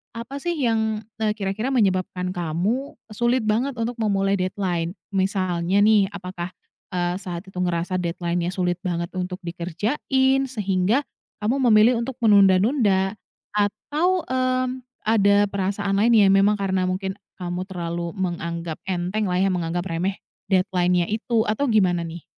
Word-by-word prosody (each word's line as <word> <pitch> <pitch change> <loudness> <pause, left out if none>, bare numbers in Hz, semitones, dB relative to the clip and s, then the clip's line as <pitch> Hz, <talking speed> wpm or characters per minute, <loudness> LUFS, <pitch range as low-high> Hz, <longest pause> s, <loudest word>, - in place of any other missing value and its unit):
Apa 235 +5 -6
sih 345 +4 -2
yang, 220 -3 +1 0.2
eee, 215 -1 +1
kira-kira 205 +3 -2
menyebabkan 185 -5 +1
kamu, 180 - -2 0.2
sulit 240 +2 +2
banget 245 +6 +1
untuk 235 +2 -2
memulai 195 -2 +1
deadline? 185 -2 -1 0.2
Misalnya 190 -1 +1
nih, 210 -2 +5
apakah, 180 -1 -6 0.4
eee, 175 0 0
saat 175 -2 -6
itu 190 - -13
ngerasa 180 0 0
deadline-nya 175 0 -2
sulit 180 -2 0
banget 170 -1 -2
untuk 180 +1 -4
dikerjain, 245 - 0
sehingga 205 0 +1 0.4
kamu 250 +6 +1
memilih 215 +4 +6
untuk 250 +3 -3
menunda-nunda. 200 0 +4 0.4
Atau, 295 - +1
mmm, 255 0 0 0.2
ada 205 -2 +4
perasaan 200 0 -1
lain, 235 +3 +4
ya 200 -3 +6
memang 195 +2 +4
karena 190 -1 +1
mungkin, 190 +1 -3 0.2
kamu 180 +1 -3
terlalu 170 -2 -4
menganggap 170 -3 -3
entenglah 185 +2 -1
ya, 195 - +3
menganggap 175 -1 -1
remeh 180 +4 -2 0.3
deadline-nya 180 -2 +2
itu, 225 +1 0
atau 280 +7 0
gimana 185 -7 +2
nih? 165 0 -8
195 Hz, 135 wpm, -23 LUFS, 180-220 Hz, 0.4 s, memilih